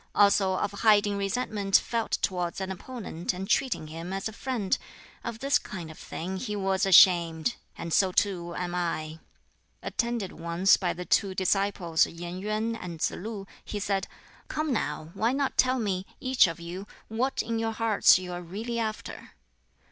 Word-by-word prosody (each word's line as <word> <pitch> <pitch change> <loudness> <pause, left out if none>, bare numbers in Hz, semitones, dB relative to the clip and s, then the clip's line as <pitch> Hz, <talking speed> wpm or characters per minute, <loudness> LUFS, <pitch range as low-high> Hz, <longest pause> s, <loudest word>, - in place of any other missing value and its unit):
Also 200 -2 +4
of 195 +2 -1
hiding 205 -1 +3
resentment 200 -1 -1
felt 230 -1 +2
towards 180 -2 -1
an 190 0 -3
opponent 190 -4 -4
and 190 +2 -5
treating 250 -10 +1
him 165 +3 -7
as 195 +1 -2
a 220 - -7
friend 225 -5 -1 0.4
of 235 -1 -4
this 275 +4 +2
kind 175 -7 -7
of 155 - -13
thing 185 +3 -5
he 210 +1 -3
was 195 -1 +1
ashamed, 170 +1 +6 0.2
and 165 -1 -4
so 190 -2 +4
too 175 -3 0
am 175 -1 -3
I." 160 -3 -2 0.6
Attended 235 -5 -2
once 170 +4 +3
by 180 -3 -1
the 180 - -6
two 195 -1 +2
disciples 185 -3 +2
Yen 175 +2 -7
Yuen 215 +3 -1
and 175 -6 -7
Tsz - - +1
lu, 205 0 -6 0.2
he 210 - -5
said, 195 -1 -1 0.4
"Come 310 -2 -1
now, 155 -6 -2
why 230 +3 +1
not 275 0 0
tell 255 0 +3
me, 195 -5 -2
each 255 -5 +4
of 165 0 -5
you, 175 +4 -7 0.2
what 245 +5 -1
in 230 0 -2
your 225 0 -1
hearts 220 -4 +5
you 180 -1 -6
are 175 - -5
really 220 +7 -4
after?" 220 -1 -5
195 Hz, 170 wpm, -28 LUFS, 175-225 Hz, 0.6 s, ashamed